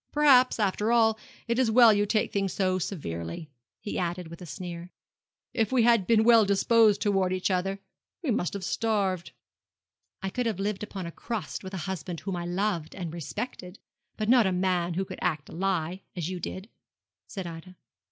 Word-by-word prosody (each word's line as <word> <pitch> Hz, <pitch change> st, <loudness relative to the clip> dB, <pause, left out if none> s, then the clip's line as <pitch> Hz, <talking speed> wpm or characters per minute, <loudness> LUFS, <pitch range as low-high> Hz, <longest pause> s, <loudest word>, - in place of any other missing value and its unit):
Perhaps, 265 Hz, -5 st, +5 dB
after 210 Hz, +2 st, +1 dB
all, 225 Hz, -2 st, +4 dB, 0.3 s
it 235 Hz, +1 st, 0 dB
is 260 Hz, -, +3 dB
as -, -, +1 dB
well 230 Hz, -1 st, +7 dB
you 205 Hz, 0 st, +1 dB
take 215 Hz, 0 st, 0 dB
things 195 Hz, -2 st, 0 dB
so 185 Hz, -1 st, +1 dB
severely,' 140 Hz, -, -5 dB, 0.3 s
he 205 Hz, -, -4 dB
added, 175 Hz, -1 st, -3 dB
with 170 Hz, +1 st, -11 dB
a 175 Hz, -, -8 dB
sneer. 175 Hz, +2 st, -7 dB, 0.6 s
'If 225 Hz, -1 st, 0 dB
we 255 Hz, -3 st, +4 dB
had 230 Hz, -5 st, +4 dB
been 225 Hz, -2 st, +4 dB
well 230 Hz, -1 st, +7 dB
disposed 210 Hz, +1 st, +4 dB
towards 195 Hz, -3 st, +1 dB
each 185 Hz, +1 st, -1 dB
other, 190 Hz, +1 st, 0 dB, 0.5 s
we 285 Hz, -, 0 dB
must 180 Hz, -5 st, -1 dB
have 200 Hz, -2 st, -5 dB
starved.' 195 Hz, -3 st, -1 dB, 0.9 s
'I 195 Hz, -, -2 dB
could 250 Hz, +2 st, -1 dB
have 215 Hz, -5 st, -2 dB
lived 200 Hz, 0 st, -2 dB
upon 200 Hz, -3 st, -5 dB
a 170 Hz, -, -5 dB
crust 225 Hz, +2 st, -5 dB
with 190 Hz, +1 st, -6 dB
a 175 Hz, -3 st, -4 dB
husband 180 Hz, -3 st, -5 dB
whom 195 Hz, -2 st, -3 dB
I 175 Hz, -1 st, -4 dB
loved 175 Hz, -3 st, -2 dB
and 175 Hz, -4 st, -5 dB
respected; 180 Hz, -, -6 dB, 0.4 s
but 215 Hz, -, -2 dB
not 240 Hz, -3 st, +5 dB
with 185 Hz, -, 0 dB
a -, -, -1 dB
man 180 Hz, -2 st, 0 dB
who 190 Hz, +2 st, -1 dB
could -, -, -8 dB
act 150 Hz, -2 st, -1 dB
a -, -, -11 dB
lie, 180 Hz, 0 st, -1 dB
as 175 Hz, 0 st, -3 dB
you 185 Hz, -, -4 dB
did,' 185 Hz, +3 st, -6 dB, 0.6 s
said 190 Hz, -3 st, -6 dB
Ida. 170 Hz, +2 st, -9 dB
190 Hz, 200 wpm, -28 LUFS, 175-220 Hz, 0.9 s, well